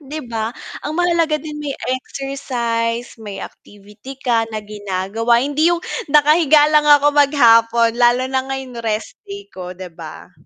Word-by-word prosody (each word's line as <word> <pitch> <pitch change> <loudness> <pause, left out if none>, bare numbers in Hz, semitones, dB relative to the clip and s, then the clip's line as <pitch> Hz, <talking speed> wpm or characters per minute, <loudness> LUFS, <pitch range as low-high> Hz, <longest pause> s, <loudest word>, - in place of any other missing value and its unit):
'Di 300 +2 -7
ba? 220 0 -2 0.3
Ang 310 +2 -5
mahalaga 340 -3 +1
din 300 0 -8
may 285 -2 -4 0.2
exercise, 240 -4 -3
may 205 -2 -8
activity 205 +8 -12
ka 230 -4 0
na 220 - -5
ginagawa. 205 +3 -1
Hindi 295 +4 +1
yung 345 -1 0 0.3
nakahiga 300 +1 +5
lang 300 -1 +4
ako 290 0 +5
maghapon 235 -5 +4
lalo 245 +1 +4
na 260 0 -1
ngayon 265 -3 -5
rest 220 -1 -4
day 400 0 -8
ko, 180 -1 -8
'di 185 -2 -9
ba? 165 +2 -11
255 Hz, 150 wpm, -18 LUFS, 225-295 Hz, 0.3 s, nakahiga